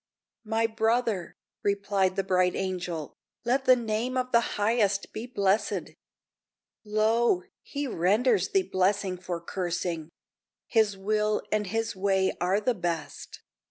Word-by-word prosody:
"My 225 +1 +1
brother," 225 -3 0 0.3
replied 200 -2 +1
the 195 - 0
bright 185 -1 +2
Angel, 175 -5 -3 0.3
"Let 265 +3 +1
the 255 - +7
name 235 +2 -2
of 255 0 -1
the 235 0 +2
Highest 205 -2 +1
be 225 +3 -5
blessed! 200 -4 0 0.9
Lo! 215 -2 +2 0.2
he 285 +1 -4
renders 210 0 +2
thee 195 - +2
blessing 190 +1 +1
for 175 -1 -4
cursing! 175 -2 -3 0.6
His 215 -4 +2
will 210 +2 0
and 210 -1 +1
His 225 +2 -2
way 190 0 +1
are 185 +3 +2
the 245 +4 +1
best. 175 -5 -5
205 Hz, 125 wpm, -28 LUFS, 185-225 Hz, 0.9 s, the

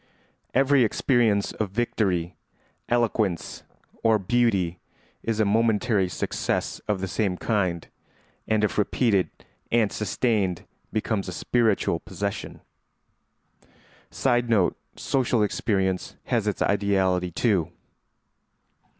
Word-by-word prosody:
Every 135 0 +4
experience 115 -3 +2
of 105 -3 -3
victory, 95 -5 -1 0.5
eloquence, 110 -6 0 0.4
or 110 -1 +4
beauty 100 -5 +1 0.4
is 115 -1 -2
a 110 - +4
momentary 110 -2 +2
success - - -2
of 105 -3 0
the 95 - -2
same 95 -2 -1
kind, 95 -7 -1 0.6
and 110 -1 +2
if 105 - +1
repeated 100 - +2 0.4
and 115 -3 +3
sustained 100 -3 0 0.3
becomes 110 -2 -1
a - - -4
spiritual 110 -5 +1
possession. 100 +3 -5 1.5
[Sidenote: 120 -7 +2 0.2
Social 125 -4 +1
experience 95 -3 -1
has - - 0
its - - 0
ideality 95 -3 +1
too. 90 -3 +1
105 Hz, 100 wpm, -25 LUFS, 95-115 Hz, 1.5 s, Every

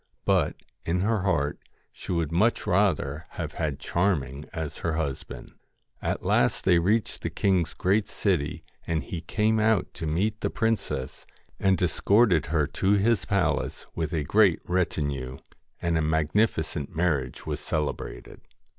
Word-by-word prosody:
But, - - +2 0.3
in 90 +2 0
her 110 +1 +1
heart, 75 -7 0 0.3
she - - -8
would 85 -3 0
much 105 +8 +2
rather 90 -7 +1
have - - -3
had 75 -4 -3
Charming 75 -5 -1
as 80 -3 -5
her 85 - -1
husband. 70 -4 -4 0.5
At - - -2
last - - +2
they 90 -2 +5
reached 105 +6 0
the - - -2
king's 90 -4 +1
great 100 +3 +1
city, 85 -8 -1 0.2
and 80 -3 0
he 85 +4 -5
came 110 +6 +1
out 110 -2 +2
to 80 - -5
meet 100 +8 0
the - - 0
princess, 115 - -2 0.3
and 95 -1 +3
escorted 95 - +3
her 75 -1 +2
to 95 +7 +1
his 105 +2 +2
palace 90 -6 0
with 80 -2 -2
a 80 -4 0
great 100 +2 +4
retinue, 70 -7 -1 0.4
and 85 -1 +1
a - - +1
magnifi 80 +4 +2
cent 75 -2 -6
marriage 80 -5 -1
was - - -3
celebrated. 75 -2 -4
85 Hz, 150 wpm, -27 LUFS, 75-100 Hz, 0.5 s, they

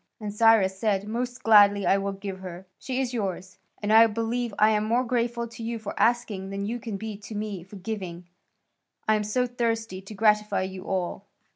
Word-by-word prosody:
And 210 -2 -5
Cyrus 210 -4 +4
said, 205 -2 0
"Most 245 +3 -4
gladly 205 -2 +6
I 195 +3 +4
will 200 0 -2
give 195 -1 -6
her; 185 0 -8
she 260 -1 -3
is 255 -2 -1
yours. 190 -3 -4 0.2
And 210 +1 +2
I 225 +1 +8
believe 230 +2 -2
I 215 +1 +5
am 210 -1 +1
more 235 +4 +2
grateful 235 -1 -1
to 230 - -11
you 230 +1 -3
for 220 -2 -6
asking 220 -5 +1
than 200 0 -3
you 235 +3 -3
can 220 -3 -5
be 220 +1 -5
to 210 +1 -9
me 205 -3 -4
for 190 +3 -13
giving; 185 -3 -6 0.8
I 215 - +5
am 215 -1 +1
so 230 +4 0
thirsty 230 -5 -2
to 195 +2 -10
gratify 210 -1 +2
you 190 0 -6
all." 190 +1 -3
210 Hz, 205 wpm, -26 LUFS, 195-230 Hz, 0.8 s, I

